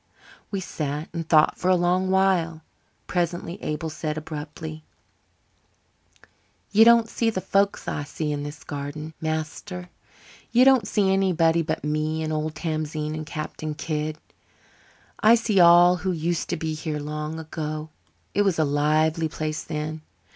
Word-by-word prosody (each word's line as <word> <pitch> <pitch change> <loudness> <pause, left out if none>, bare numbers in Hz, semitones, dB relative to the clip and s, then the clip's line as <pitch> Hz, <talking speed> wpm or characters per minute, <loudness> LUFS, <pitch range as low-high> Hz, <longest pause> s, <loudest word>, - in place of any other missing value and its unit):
We 200 - -2
sat 150 -3 -4
and 165 -1 -5
thought 155 -2 +4
for 180 - +1
a 185 - +6
long 180 +1 +1
while. 180 -4 +2 0.4
Presently 175 0 -2
Abel 155 +1 -3
said 155 0 -3
abruptly: 155 0 -7 1.9
"You 215 +2 +7
don't 230 0 +6
see 230 0 0
the 210 - -2
folks 200 +1 +1
I 145 - -2
see 150 +1 -3
in 145 -1 -2
this 145 +1 -7
garden, 145 +2 -6
master. 160 +3 -4 0.6
You 245 +2 +6
don't 265 -6 +5
see 195 -2 +2
anybody 170 -4 +3
but 160 0 -3
me 155 +1 -1
and 155 0 -2
old 155 0 -2
Tamzine 155 -1 -3
and 155 -1 -5
Captain 155 0 -5
Kidd. 155 0 -3 1.0
I 225 0 +7
see 225 -4 +1
all 175 +1 +7
who 185 +1 -2
used 170 0 -2
to 175 - -1
be 160 0 -2
here 155 -1 -3
long 150 +1 -4
ago. 155 -1 -5 0.4
It 205 - +2
was 195 -4 +2
a 160 - +3
lively 155 +3 +2
place 155 0 -3
then. 155 0 -4
160 Hz, 150 wpm, -25 LUFS, 155-180 Hz, 1.9 s, You